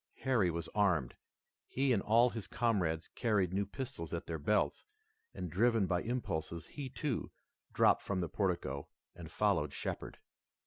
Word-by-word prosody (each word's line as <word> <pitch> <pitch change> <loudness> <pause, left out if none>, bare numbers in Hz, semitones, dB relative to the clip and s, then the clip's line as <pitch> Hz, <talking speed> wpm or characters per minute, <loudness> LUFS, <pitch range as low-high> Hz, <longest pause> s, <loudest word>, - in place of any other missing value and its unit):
Harry 120 -9 +3
was 85 0 -3
armed. 90 - +2 0.5
He 135 0 +2
and 100 - +2
all 115 +3 +4
his 110 -4 -5
comrades 90 -9 0
carried 105 -7 +1
new 100 +1 0
pistols 120 - -5
at 85 - -5
their 80 -1 -4
belts, 105 +8 +1 0.5
and 90 - -5
driven 115 +3 +3
by 90 -1 +1
impulse 115 -10 -2 0.2
he, 140 -3 -6
too, 135 -1 -2 0.4
dropped - - +4
from 95 -2 -2
the 85 - -1
portico 90 -7 -1 0.3
and - - -9
followed - - +1
Shepard. - - -4
100 Hz, 150 wpm, -34 LUFS, 85-120 Hz, 0.5 s, all